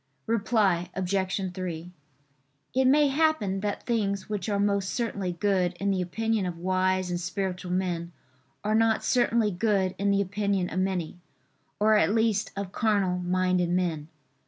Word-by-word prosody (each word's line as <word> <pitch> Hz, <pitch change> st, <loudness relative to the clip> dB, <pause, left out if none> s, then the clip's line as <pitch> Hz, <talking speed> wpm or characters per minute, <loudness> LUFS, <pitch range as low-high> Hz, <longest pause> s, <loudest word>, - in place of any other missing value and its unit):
Reply 200 Hz, -6 st, +1 dB
Obj. 190 Hz, 0 st, -1 dB
3: 180 Hz, -2 st, -5 dB, 0.8 s
It 260 Hz, 0 st, +2 dB
may 290 Hz, +3 st, +5 dB
happen 275 Hz, -10 st, +1 dB
that 205 Hz, +1 st, -3 dB
things 200 Hz, -5 st, -1 dB
which 210 Hz, -1 st, -3 dB
are 200 Hz, -1 st, 0 dB
most 200 Hz, -1 st, +1 dB
certainly 200 Hz, -6 st, -2 dB
good 185 Hz, 0 st, +1 dB
in 200 Hz, +3 st, -1 dB
the 190 Hz, -1 st, 0 dB
opinion 220 Hz, +2 st, -1 dB
of 175 Hz, -2 st, -5 dB
wise 185 Hz, +1 st, 0 dB
and 175 Hz, -, -1 dB
spiritual 185 Hz, 0 st, -3 dB
men 175 Hz, -2 st, -1 dB, 0.5 s
are 210 Hz, +1 st, 0 dB
not 225 Hz, 0 st, +3 dB
certainly 235 Hz, -3 st, +2 dB
good 190 Hz, -1 st, +1 dB
in 200 Hz, 0 st, +1 dB
the 200 Hz, 0 st, +3 dB
opinion 200 Hz, -1 st, -1 dB
of 185 Hz, -, -1 dB
many, 185 Hz, -3 st, -2 dB, 0.6 s
or 215 Hz, +1 st, +5 dB
at 210 Hz, 0 st, +2 dB
least 220 Hz, -2 st, +1 dB
of 200 Hz, -2 st, -4 dB
carnal 200 Hz, -5 st, +1 dB
minded 180 Hz, 0 st, +1 dB
men. 170 Hz, -4 st, -1 dB
195 Hz, 155 wpm, -27 LUFS, 180-210 Hz, 0.8 s, may